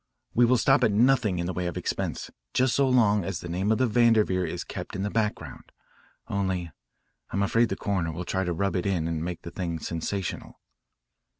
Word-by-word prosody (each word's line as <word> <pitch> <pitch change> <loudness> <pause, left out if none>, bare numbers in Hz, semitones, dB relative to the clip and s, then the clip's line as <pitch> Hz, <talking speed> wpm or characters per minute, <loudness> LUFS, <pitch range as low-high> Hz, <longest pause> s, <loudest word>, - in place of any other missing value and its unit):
We 120 - +5
will 125 +2 +4
stop 135 +3 +4
at 115 - +4
nothing 110 -3 +3
in 85 - -1
the 90 - -2
way 90 0 -2
of 90 - -4
expense - - -3 0.2
just 130 -1 +3
so 140 -1 +3
long 105 -6 +4
as 95 +1 -3
the - - -7
name 95 +5 -1
of 110 - +3
the 130 - +3
Vanderveer 110 -6 +3
is - - -4
kept - - -7
in 95 - -2
the 105 - -2
background. 110 -2 -3 0.6
Only, 95 -4 -2 0.6
I'm 100 +2 0
afraid 115 +3 +2
the - - -1
coroner 95 -5 -1
will 90 +3 -5
try 95 +1 -1
to 90 - -1
rub 100 +4 -1
it 90 +1 0
in 85 -5 0
and 80 -1 -2
make 90 0 -5
the 85 - -7
thing 85 -2 -3
sensational." 85 +4 -4
100 Hz, 210 wpm, -27 LUFS, 90-115 Hz, 0.6 s, We